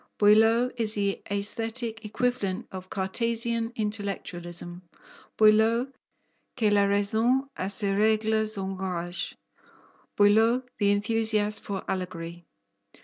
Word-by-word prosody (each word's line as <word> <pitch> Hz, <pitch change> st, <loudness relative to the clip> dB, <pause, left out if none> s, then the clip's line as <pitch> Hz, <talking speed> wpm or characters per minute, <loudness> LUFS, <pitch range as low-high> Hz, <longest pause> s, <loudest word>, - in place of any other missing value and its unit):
Boileau 225 Hz, +4 st, +4 dB
is 220 Hz, -2 st, +2 dB
the 200 Hz, -1 st, -1 dB
aesthetic 225 Hz, +3 st, -1 dB
equivalent 215 Hz, -2 st, -2 dB
of 185 Hz, 0 st, -8 dB
Cartesian 230 Hz, +4 st, -1 dB
intellectualism, 180 Hz, -5 st, -5 dB, 0.6 s
Boileau 220 Hz, +4 st, +4 dB, 0.7 s
que 215 Hz, -4 st, +2 dB
la 200 Hz, -1 st, +4 dB
raison 220 Hz, +7 st, +2 dB
à 190 Hz, -, -3 dB
ses 200 Hz, 0 st, 0 dB
règles 220 Hz, +1 st, +1 dB
engage, 185 Hz, -2 st, -4 dB, 0.8 s
Boileau 220 Hz, +5 st, +4 dB, 0.2 s
the 200 Hz, -1 st, +3 dB
enthusiast 215 Hz, 0 st, +1 dB
for 195 Hz, -2 st, -5 dB
allegory. 175 Hz, -2 st, -5 dB
210 Hz, 95 wpm, -27 LUFS, 195-225 Hz, 0.8 s, Boileau